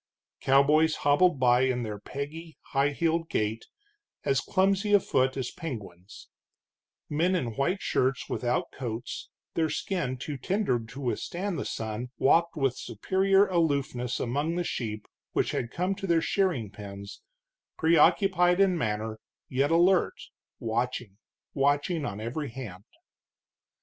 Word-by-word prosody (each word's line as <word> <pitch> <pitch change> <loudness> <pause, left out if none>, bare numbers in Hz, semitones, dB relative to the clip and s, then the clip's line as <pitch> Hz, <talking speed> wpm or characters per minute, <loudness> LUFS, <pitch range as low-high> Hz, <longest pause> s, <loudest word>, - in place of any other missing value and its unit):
Cowboys 150 +4 +4
hobbled 145 +1 +4
by 125 -1 +4
in 130 -2 +1
their 105 -2 -5
peggy, 155 +7 -7 0.2
high 140 +1 +3
heeled 165 +2 0
gait, 110 +1 -1 0.6
as 135 -1 +2
clumsy 195 +2 +1
afoot 130 -9 +3
as 130 -3 -3
penguins; 105 - -8 0.8
men 170 +5 +1
in 120 -10 -2
white 175 +8 0
shirts 130 0 0
without 120 0 -1
coats, 120 -2 -5 0.2
their 160 -1 +1
skin 160 -11 -2
too 140 +2 -5
tender 190 - 0
to 115 +5 -10
withstand 170 - -2
the - - -3
sun, 110 +2 -4
walked 170 +4 +3
with 135 -5 +1
superior 195 - +2
aloofness 140 -8 0
among 145 +7 -1
the 175 - 0
sheep 110 -9 -4 0.3
which - - +1
had 115 - -2
come 180 +7 -1
to 195 0 -5
their 170 -2 +4
shearing 165 - 0
pens, 100 -1 -9 0.6
preoccupied 175 +2 +4
in 195 -2 +4
manner, 110 -5 -2 0.3
yet 135 +2 +1
alert, 175 +2 +4 0.4
watching, 115 -2 -3 0.3
watching, 145 +3 +1
on 100 -4 -4
every 130 +7 -4
hand. 110 -6 -8
140 Hz, 130 wpm, -28 LUFS, 120-170 Hz, 0.8 s, Cowboys